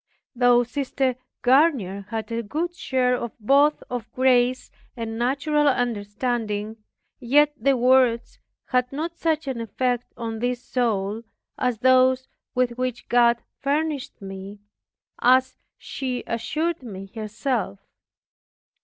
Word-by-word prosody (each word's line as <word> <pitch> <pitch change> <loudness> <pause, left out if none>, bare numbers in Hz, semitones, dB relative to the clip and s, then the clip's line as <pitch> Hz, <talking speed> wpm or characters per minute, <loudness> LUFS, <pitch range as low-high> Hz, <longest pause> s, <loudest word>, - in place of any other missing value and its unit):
Though 245 0 +5
Sister 265 0 -1 0.3
Garnier 245 - +3
had 225 0 -4
a 230 0 -1
good 315 +11 -3
share 255 -6 +1
of 235 -2 -5
both 280 +7 +3
of 245 -2 -5
grace 255 0 +2 0.3
and 225 -1 -4
natural 285 +4 +1
understanding, 220 -2 -1 0.4
yet 290 +4 +4
her 275 -1 +4
words 250 -1 +3 0.3
had 250 -1 +1
not 325 +4 -4
such 320 -1 0
an 255 -3 -3
effect 245 +2 -2
on 225 -1 -4
this 245 +1 -2
soul 220 -4 -1 0.3
as 250 -3 -1
those 260 0 +4 0.3
with 250 -1 0
which 255 -2 -3
God 235 -1 +4 0.2
furnished 290 0 -2
me, 195 +1 -8 0.6
as 255 +1 +4 0.2
she 255 -2 -4
assured 305 +9 -2
me 195 -5 -9
herself. 220 - -2
245 Hz, 120 wpm, -24 LUFS, 230-265 Hz, 0.6 s, Though